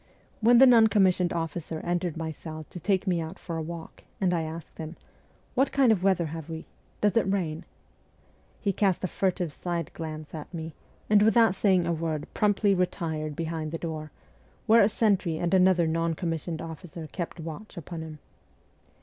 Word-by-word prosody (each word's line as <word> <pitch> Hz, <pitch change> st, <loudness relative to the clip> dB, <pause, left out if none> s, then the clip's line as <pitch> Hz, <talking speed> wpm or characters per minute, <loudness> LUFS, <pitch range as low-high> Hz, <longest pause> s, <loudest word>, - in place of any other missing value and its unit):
When 235 Hz, +2 st, +6 dB
the 265 Hz, -, +9 dB
non 235 Hz, -3 st, +7 dB
commissioned 185 Hz, -4 st, +3 dB
officer 165 Hz, -1 st, -3 dB
entered 175 Hz, -1 st, -1 dB
my 160 Hz, -1 st, -3 dB
cell 155 Hz, 0 st, -8 dB
to 180 Hz, -, -7 dB
take 195 Hz, +2 st, +1 dB
me 180 Hz, -3 st, +1 dB
out, 160 Hz, 0 st, -6 dB
for 170 Hz, -, -6 dB
a 165 Hz, -, -2 dB
walk, 165 Hz, +1 st, -8 dB, 0.2 s
and 185 Hz, -2 st, +2 dB
I 170 Hz, -, +1 dB
asked 160 Hz, 0 st, -7 dB
him, 160 Hz, +1 st, -6 dB, 0.3 s
' -, -, -35 dB
What 270 Hz, +2 st, +2 dB
kind 265 Hz, -4 st, +4 dB
of 205 Hz, -5 st, +2 dB
weather 185 Hz, -3 st, +2 dB
have 160 Hz, 0 st, -6 dB
we? 160 Hz, 0 st, -6 dB, 0.4 s
Does 210 Hz, +1 st, +2 dB
it 205 Hz, -4 st, +3 dB
rain? 165 Hz, -5 st, -2 dB, 0.5 s
' -, -, -34 dB
he 200 Hz, -2 st, +1 dB
cast 190 Hz, -3 st, +1 dB
a -, -, +1 dB
furtive 180 Hz, -4 st, -1 dB
side 170 Hz, -2 st, -3 dB
glance 155 Hz, -2 st, -7 dB
at 155 Hz, -2 st, -7 dB
me, 160 Hz, -2 st, -6 dB, 0.3 s
and 210 Hz, -1 st, +5 dB
without 220 Hz, -1 st, +5 dB
saying 190 Hz, -2 st, +3 dB
a 170 Hz, -, +1 dB
word 160 Hz, -2 st, -2 dB
promptly 205 Hz, -1 st, +3 dB
retired 160 Hz, -4 st, -1 dB
behind 160 Hz, -1 st, -3 dB
the 165 Hz, -, -2 dB
door, 155 Hz, -2 st, -5 dB, 0.6 s
where 230 Hz, +1 st, +6 dB
a 200 Hz, -, +5 dB
sentry 195 Hz, -7 st, +1 dB
and 170 Hz, +2 st, -1 dB
another 185 Hz, -2 st, +5 dB
non 165 Hz, 0 st, 0 dB
commissioned 165 Hz, -1 st, -3 dB
officer 165 Hz, 0 st, -8 dB
kept 175 Hz, -1 st, -5 dB
watch 165 Hz, +6 st, -8 dB
upon 170 Hz, 0 st, -6 dB
him. 160 Hz, -1 st, -8 dB
170 Hz, 190 wpm, -27 LUFS, 160-195 Hz, 0.6 s, the